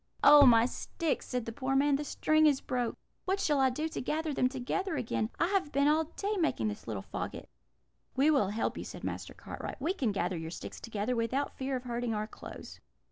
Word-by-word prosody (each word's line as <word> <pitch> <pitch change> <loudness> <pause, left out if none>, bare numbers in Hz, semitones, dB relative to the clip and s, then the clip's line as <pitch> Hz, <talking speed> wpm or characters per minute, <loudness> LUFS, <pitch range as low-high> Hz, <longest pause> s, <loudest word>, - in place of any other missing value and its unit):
"'Oh, 290 -2 +9
my 230 -1 +7
sticks!' 315 +5 -2
said 250 -3 -2
the 230 - -4
poor 265 +3 -2
man; 280 +1 +4
'the 290 - -1
string 310 +2 +3
is 280 -3 +3
broke! 245 -2 -2 0.3
What 385 +1 0
shall 295 -7 +2
I 265 -1 +5
do 300 +5 -2
to - - -4
gather 310 +3 -1
them 255 -2 +2
together 275 +8 -2
again? 220 -4 -1
I 335 - +4
have 385 -7 0
been 280 +1 +3
all 310 +2 +3
day 400 +6 -3
making 115 - +1
this 105 - -8
little 105 -4 -4
faggot.' - - -5 0.7
"'We 280 +4 +4
will 270 -10 +3
help 215 +2 -2
you,' - - -4
said - - -9
Master - - -5
Cartwright; - - -7
'we 320 +7 0
can 260 - 0
gather 180 -2 -1
your 160 0 -5
sticks 170 - -7
together 230 +2 -2
without 245 +5 -1
fear 265 0 -2
of 250 - -4
hurting 240 -2 -2
our 210 0 -1
clothes.' - - -10
265 Hz, 220 wpm, -31 LUFS, 230-305 Hz, 0.7 s, Oh